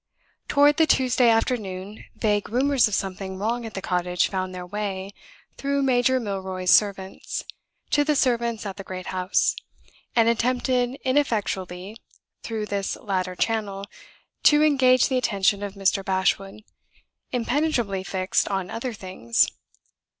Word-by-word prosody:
Toward 290 0 +4
the 320 -1 +4
Tuesday 250 -3 +3
afternoon, 210 -4 -1
vague 210 -2 0
rumors 265 +2 +3
of 210 - -1
something 190 0 -4
wrong 230 +4 -2
at 220 - -10
the 195 - -5
cottage 180 0 0
found 185 -1 -3
their 180 -1 -7
way 195 0 -4 0.4
(through 280 0 0
Major 255 0 +3
Milroy's 190 -4 -2
servants) 195 -2 +1 0.5
to 290 - +4
the 300 0 +1
servants 235 -5 0
at 195 -1 -5
the 195 - -7
great 185 -1 -7
house, 185 +1 +1 0.6
and 230 -1 +4
attempted 245 +2 +1
ineffectually 210 -7 -1 0.4
through 220 -2 -4
this 200 -2 -2
latter 185 -2 -3
channel 200 -2 -1 0.6
to 295 0 +5
engage 260 -4 +4
the 260 -1 +1
attention 200 -3 +1
of 200 -1 -5
Mr. 195 0 +1
Bashwood, 195 +2 -1 0.7
impenetrably 240 -6 0
fixed 190 -1 0
on 190 -2 -2
other 235 +1 -4
things. 185 - +1
210 Hz, 135 wpm, -24 LUFS, 190-250 Hz, 0.7 s, to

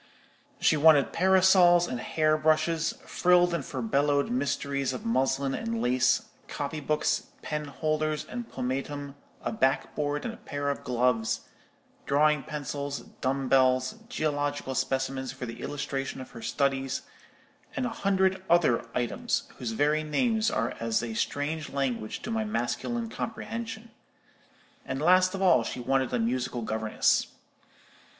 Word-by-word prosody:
She - - +4
wanted 150 -2 +5
parasols 185 -1 +5
and 125 - -4
hair 155 +3 +1
brushes, 155 +1 +1
frilled 175 0 +3
and 170 -4 -1
furbelowed 140 +3 0
mysteries 140 +1 -1
of 215 - -6
muslin 135 -9 +1
and 230 +5 -2
lace, 130 - +2 0.2
copybooks, 150 +1 -1 0.2
penholders, 155 +1 -2
and 240 -1 -6
pomatum, 140 +2 -4 0.3
a - - -1
backboard 145 -3 0
and 230 - -3
a - - -11
pair 145 -8 -3
of 140 - -6
gloves, 125 -2 +1 0.7
drawing 150 +1 +3
pencils, 145 -1 -4 0.2
dumb 135 +1 0
bells, 130 +4 +3 0.2
geological 145 - -1
specimens 130 0 -1
for 130 -1 -6
the 115 -1 -8
illustration 135 -2 -4
of 130 - -9
her 115 - -10
studies, 135 0 -1 0.7
and 255 - -1
a - - 0
hundred 190 -3 +1
other 170 -9 +4
items, 235 - -1 0.2
whose 120 -4 -3
very 150 +5 +2
names 220 - +1
are - - -1
as 115 0 0
a 115 -1 -4
strange 145 +6 -2
language 130 -6 -2
to 230 - -4
my 225 -1 0
masculine 220 - -2
comprehension; 225 +1 -5 0.9
and, 130 - -4
last 185 +4 +4
of 195 - -2
all, 170 -11 +5
she 125 - -5
wanted 130 +1 0
a 125 - +1
musical 120 +1 -1
governess. 110 0 +1
145 Hz, 135 wpm, -28 LUFS, 130-175 Hz, 0.9 s, wanted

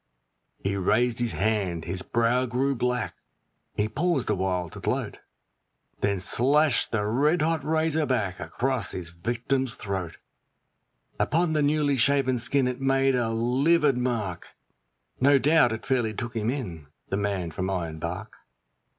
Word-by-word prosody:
He 100 0 -2
raised 115 +5 +2
his 120 -2 -1
hand, 95 -6 -1
his 90 +2 -2
brow 120 +4 +1
grew 130 +3 0
black, 125 -7 -2 0.6
he 105 - +1
paused 150 +2 0
awhile 90 -2 -1
to - - -10
gloat, - - -2 0.8
Then 100 -1 0
slashed 140 +7 +2
the 105 -2 0
red 150 +9 +2
hot 160 0 0
razor 160 -1 +1
back 105 -8 -1
across 120 +8 -2
his 85 -2 -5
victim's 120 +7 -1
throat; 95 -5 -4 1.0
Upon 165 +1 +1
the 155 - +2
newly 145 -1 +2
shaven 130 0 +2
skin 130 +2 +1
it 125 +1 -4
made 135 0 +3
a 120 -3 +1
livid 135 +6 +2
mark 115 -8 -3 0.6
No 140 +2 +5
doubt 150 -2 +4
it 110 - -5
fairly 120 -5 0
took 120 0 -5
him 110 0 0
in 90 - -4 0.2
the 95 - -1
man 100 -4 -2
from 95 +4 -3
Ironbark. 85 +3 -4
120 Hz, 140 wpm, -26 LUFS, 100-135 Hz, 1.0 s, No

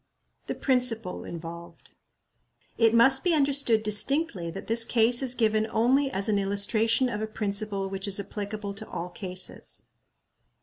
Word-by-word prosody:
The - - -3
Principle 245 -7 -1
involved. 170 0 -10 0.8
It 225 0 +3
must 265 +3 +5
be 355 -3 +2
understood 275 -6 +2
distinctly 210 - 0
that 195 +4 -8
this 230 +1 +4
case 235 +1 +3
is 255 -2 +2
given 220 -2 +1
only 260 +6 +2
as 200 -5 0
an 210 -2 +2
illustration 215 +5 +1
of 210 -3 -4
a 220 - -2
principle 205 -2 -2
which 195 +1 -4
is 200 0 -1
applicable 205 0 -5
to 220 +2 -8
all 175 +1 -5
cases. 185 0 -7
215 Hz, 145 wpm, -27 LUFS, 200-240 Hz, 0.8 s, must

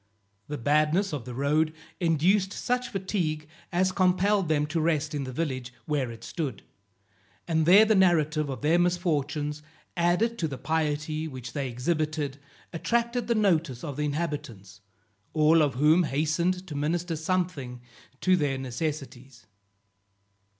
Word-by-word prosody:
The 150 - -4
badness 155 - +2
of 140 -6 -4
the 125 - -7
road 150 +4 +1 0.3
induced 185 +4 +2
such 250 0 -1
fatigue 180 -7 -2 0.2
as 185 +2 +2
compelled 185 0 +2
them 150 -1 +2
to 160 +2 -1
rest 155 -2 0
in 145 -2 -2
the 130 - -5
village 130 -4 -3
where 140 -5 -1
it 115 -1 -10
stood, 145 - -4 0.8
and 160 -2 +1
there 200 +5 +8
the 220 - +3
narrative 155 -6 +3
of 130 -4 -5
their 165 +3 +4
misfortunes, 150 -4 0 0.3
added 180 +7 +1
to 165 - 0
the 135 -3 -6
piety 155 +1 -1
which 130 -4 -8
they 140 -3 -2
exhibited, 150 +2 -2 0.3
attracted 235 +6 0
the 235 - +2
notice 170 - +1
of 145 -5 -5
the 150 +1 -1
inhabitants, 145 - -4 0.5
all 160 +1 +5
of 145 -5 +1
whom 155 +6 +4
hastened 170 +6 0
to 170 - -8
minister 165 +4 -1
something 160 -7 -2 0.4
to 185 0 +4
their 145 -6 0
necessities. 130 -2 -5
155 Hz, 145 wpm, -27 LUFS, 145-175 Hz, 0.8 s, there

